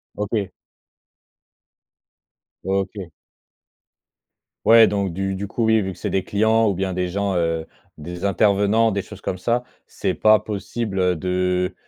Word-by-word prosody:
OK. 105 -1 -2 2.1
OK. 95 -1 -3 1.5
Ouais 115 0 +8
donc 100 -3 -1
du 95 +2 -2
du 100 +2 -4
coup 115 +3 -1
oui, 110 -1 +4
vu 95 0 -3
que 90 - -11
c'est - - -4
des 95 - 0
clients 110 +1 +2
ou 100 - -1
bien 95 0 -2
des 90 0 -1
gens, 100 +1 -1
heu, 80 -1 0 0.3
des 85 +4 -6
intervenants, 100 +3 +3
des 100 0 -1
choses 105 0 -12
comme 95 -2 -4
ça, 120 +4 0 0.2
c'est - - -2
pas 110 0 +5
possible, 105 0 -4
heu, 90 -1 +2
de, 90 +1 -1
100 Hz, 145 wpm, -22 LUFS, 90-105 Hz, 2.1 s, Ouais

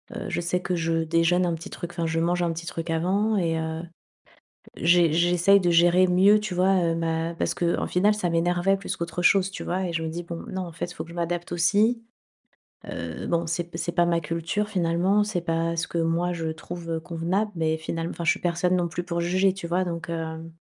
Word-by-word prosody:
Heu, - - -5
je - - -1
sais 180 +1 -1
que 180 - -2
je 165 -1 0
déjeune 165 +2 +2
un 175 - 0
petit 165 +5 -9
truc, 175 -1 -6
enfin, 170 -1 -2
je 160 0 0
mange 175 +1 +1
un 170 -1 0
petit 170 +1 -7
truc 165 0 -5
avant 195 +7 +1
et 165 -3 0
heu, 160 0 -3 1.0
j'e 170 -1 +4
j'essaye 175 +4 +4
de 175 - +1
gérer 175 +2 +5
mieux 195 +4 +5
tu 210 -3 -4
vois? 185 +2 +3
Heu, 165 0 +1
ma 165 0 -1
parce - - -1
qu'au 170 -1 0
final 200 +4 +3
ça 210 -4 -1
m'énervait 175 +3 +2
plus 195 - -4
qu'autre 170 +1 -4
chose 190 +1 +4
tu - - -6
vois? 185 +2 -1
Et 175 - -3
je 165 - -1
me 160 - -2
dis: 175 +2 -5
«Bon, 170 -1 -7
non, 190 0 -3
en 170 - -9
fait 175 +2 -5
faut - - -6
que 170 - -14
je - - -10
m'adapte 175 0 -3
aussi. 210 +7 +2 0.9
Heu, - - -5
bon 170 0 0
c'est 165 +2 -1
p - - -7
c'est 170 +2 -2
pas 175 0 +3
ma 170 0 +2
culture 170 +6 -2
finalement 185 +2 +2
c'est 205 -4 -2
pas 165 0 -1
ce 165 - -1
que 170 - -3
moi 165 +2 +1
je 165 -2 -3
trouve 165 +1 -5
convenable 175 +6 -2
mais 160 -1 +1
finalem 165 +1 -4
enfin, 170 - -5
je - - +5
suis - - -7
personne 180 +1 +1
non 175 -1 0
plus 175 +1 -4
pour 170 -1 -2
juger» 185 +2 +2
tu 190 -3 -6
vois? 180 +2 +1
Donc 170 -2 -5
hem 165 0 -5
170 Hz, 235 wpm, -25 LUFS, 165-180 Hz, 1.0 s, gérer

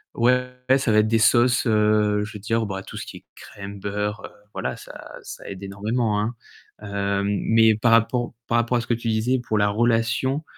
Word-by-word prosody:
ouais, 125 +1 +2 0.2
ça 130 -4 0
va 110 - +5
être 105 - +3
des 115 0 +3
sauces, 120 +3 +4
heu, 105 -1 +2
je 110 - -10
veux 105 - -7
dire, 115 +2 -1
bah, 95 -1 -4
tout - - -11
ce - - -5
qui - - -9
est - - -17
crème, 100 0 -10
beurre, 105 +1 -3
heu, - - -9 0.2
voilà, - - -4
ça - - -11
ça - - -10
aide 95 -1 -8
énormément, 105 +2 -1
hein. 115 +3 -3 0.5
Heu 100 -1 -1
mais 110 +2 +3
par 115 +2 +2
rappo 120 +1 +1
par 120 - 0
rapport 120 +1 +1
à - - 0
ce 120 - -10
que 120 - +1
tu 115 0 -4
disais, 115 +4 +1
pour 110 - 0
la 100 0 +3
relation, 120 +6 +1
110 Hz, 215 wpm, -23 LUFS, 105-120 Hz, 0.5 s, va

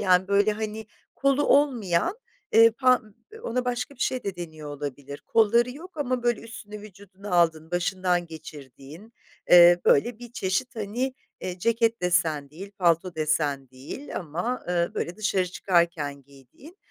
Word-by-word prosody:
yani 185 -1 +3
böyle 200 +1 +3
hani 215 0 -5 0.3
kolu 275 +1 +2
olmayan, 260 - +2 0.3
eee, 230 +1 +7
pa 255 +2 +3 0.4
ona 250 - -2
başka 245 +3 -3
bir 255 - -22
şey 255 -3 -1
de 195 -2 -4
deniyor 160 -3 -8
olabilir 140 0 -7
kolları 235 +2 +3
yok 325 +7 -12
ama 255 -4 -1
böyle 240 -2 +1
üstünü 215 -2 -10
vücuduna 200 -1 -12
aldığın 165 -2 +2
başından 180 0 0
geçirdiğin, 155 - -12 0.4
eee, 175 0 +8
böyle 220 +11 +3
bir 240 -1 -11
çeşit 240 +5 -2
hani, 235 +5 -3 0.3
eee, 180 0 -5
ceket 230 +1 +1
desen 165 -5 +1
değil, 190 +6 -10
palto 170 0 +2
desen 150 -4 -1
değil 135 - -9
ama, 175 +10 -3
ııı, 175 -1 0
böyle 170 +2 -3
dışarı 195 -3 0
çıkarken 170 -6 0
giydiğin, 140 - -17
190 Hz, 145 wpm, -25 LUFS, 165-235 Hz, 0.4 s, eee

